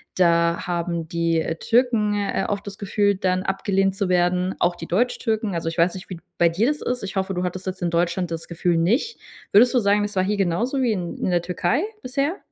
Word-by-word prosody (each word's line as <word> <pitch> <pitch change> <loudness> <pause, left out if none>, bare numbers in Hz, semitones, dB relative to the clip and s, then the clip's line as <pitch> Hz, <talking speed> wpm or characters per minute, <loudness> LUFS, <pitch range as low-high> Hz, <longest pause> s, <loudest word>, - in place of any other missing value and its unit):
da 170 -1 +2
haben 170 -2 -2
die, 165 -1 +1
äh, 165 - -2
Türken, 225 0 +2
äh, 205 -1 -1
auch 205 - -1
das 200 -1 -9
Gefühl, 205 0 +1
dann 185 -1 0
abgelehnt 195 0 0
zu 195 0 -1
werden, 180 +1 +1
auch 175 0 +2
die 165 - -8
Deutschtürken. 220 0 0
Also, 165 -1 -3
ich 165 - -7
weiß 170 +1 +3
nicht, 185 - -9
wie 185 - -5
d 170 - -14 0.2
bei 170 -1 +5
dir 200 +9 +1
das 295 0 -1
ist. 250 -2 -2
Ich 195 0 -5
hoffe, 190 0 -1
du 180 0 -2
hattest 180 +1 -4
jetzt 185 0 -5
in 175 - 0
Deutschland 175 +1 0
das 165 0 -5
Gefühl 170 0 0
nicht. 235 - +1 0.3
Würdest 240 +6 +6
du 250 - +4
sagen: 205 -1 +2
„Es 205 0 -4
war 185 - +2
hier 210 +2 0
genauso 220 +9 0
wie 245 - +2
in 210 - 0 0.2
in - - -1
der 175 - +2
Türkei 180 - 0 0.2
bisher“? 275 +7 -1
190 Hz, 235 wpm, -23 LUFS, 175-210 Hz, 0.3 s, Würdest